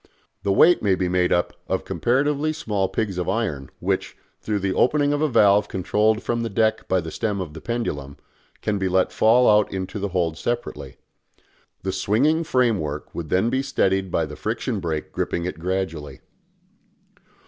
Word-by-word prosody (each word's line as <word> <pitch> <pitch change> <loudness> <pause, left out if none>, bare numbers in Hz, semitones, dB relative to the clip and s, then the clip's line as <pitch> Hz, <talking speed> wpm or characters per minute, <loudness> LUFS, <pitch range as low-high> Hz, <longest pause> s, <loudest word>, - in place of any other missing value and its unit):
The 100 - 0
weight 170 - +5
may 100 -3 +3
be 90 0 -1
made 90 0 +1
up 85 - +1
of - - -1
comparatively 145 +5 +1
small 105 -10 -1
pigs 95 -1 -2
of 90 - -2
iron, 75 - -2
which, - - -2 0.2
through 105 -1 -1
the 95 -1 -1
opening 145 +5 +2
of 145 - -1
a 155 - +2
valve 105 -4 +4
controlled 105 +4 +1
from 120 0 -1
the 115 - -2
deck 110 +1 +1
by 95 -1 +2
the 80 0 -7
stem 105 0 -2
of 90 -5 -5
the 80 - -9
pendulum, 75 - -3 0.5
can 105 -1 0
be 95 -1 0
let 95 0 +2
fall 120 +3 +4
out 105 -1 +4
into 95 +2 -4
the 100 - -1
hold 85 -3 -1
separately. 120 0 -4 0.9
The 95 - -1
swinging 125 - +2
framework 110 - 0
would 80 -3 -5
then 95 +6 +2
be 130 - +1
steadied 95 -8 0
by 85 - 0
the 75 0 -9
friction 110 - -2
brake 80 -4 -3
gripping 85 - -2
it 90 -3 -5
gradually. 90 -4 -3
100 Hz, 180 wpm, -23 LUFS, 90-115 Hz, 0.9 s, weight